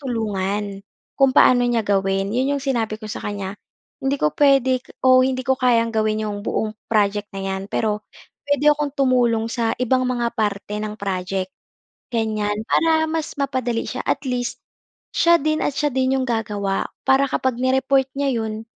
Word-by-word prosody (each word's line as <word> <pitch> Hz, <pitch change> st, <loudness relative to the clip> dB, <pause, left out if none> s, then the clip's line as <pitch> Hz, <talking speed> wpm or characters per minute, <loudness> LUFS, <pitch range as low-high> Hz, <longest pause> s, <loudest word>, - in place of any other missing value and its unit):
tulungan 205 Hz, -5 st, -2 dB, 0.4 s
kung 270 Hz, -1 st, +5 dB
paano 245 Hz, -1 st, +6 dB
niya 235 Hz, -2 st, +1 dB
gawin. 195 Hz, 0 st, +1 dB
'Yon 265 Hz, +4 st, +1 dB
yung 275 Hz, -, -9 dB
sinabi 235 Hz, -6 st, 0 dB
ko 215 Hz, -, -7 dB
sa -, -, -4 dB
kanya. 200 Hz, -1 st, -4 dB, 0.4 s
Hindi 270 Hz, +1 st, 0 dB
ko 150 Hz, -, +4 dB
puwede 270 Hz, -3 st, +4 dB, 0.2 s
o 255 Hz, 0 st, +7 dB
hindi 260 Hz, 0 st, 0 dB
ko 265 Hz, 0 st, +2 dB
kayang 235 Hz, -3 st, +3 dB
gawin 215 Hz, 0 st, +1 dB
yung 205 Hz, -1 st, -4 dB
buong 215 Hz, 0 st, -2 dB
project 205 Hz, -1 st, +1 dB
na 195 Hz, -, -4 dB
'yan 190 Hz, 0 st, -3 dB
pero 210 Hz, -1 st, -1 dB, 0.4 s
puwede 285 Hz, +1 st, 0 dB
akong 295 Hz, -2 st, -2 dB
tumulong 245 Hz, -4 st, +2 dB
sa 230 Hz, -1 st, 0 dB
ibang 255 Hz, +1 st, +2 dB
mga 240 Hz, -2 st, -1 dB
parte 210 Hz, -1 st, -2 dB
ng 215 Hz, 0 st, -4 dB
project, 190 Hz, -1 st, -2 dB, 0.7 s
ganyan. 215 Hz, -2 st, 0 dB, 0.2 s
Para 320 Hz, -1 st, +3 dB
mas 320 Hz, -1 st, -3 dB
mapadali 255 Hz, -4 st, -1 dB
siya. 255 Hz, -, -4 dB
At 275 Hz, -, 0 dB
least, 245 Hz, -1 st, -3 dB, 0.5 s
siya 340 Hz, 0 st, +5 dB
din 310 Hz, +1 st, 0 dB
at 290 Hz, -, 0 dB
siya 295 Hz, -, +1 dB
din 260 Hz, 0 st, +1 dB
yung 260 Hz, -, -2 dB
gagawa 205 Hz, -4 st, -1 dB, 0.2 s
para 265 Hz, +1 st, +5 dB
kapag 260 Hz, -2 st, -1 dB
ni-report 265 Hz, +1 st, +2 dB
niya 280 Hz, -2 st, +1 dB
'yon, 220 Hz, 0 st, -5 dB
235 Hz, 170 wpm, -21 LUFS, 210-265 Hz, 0.7 s, o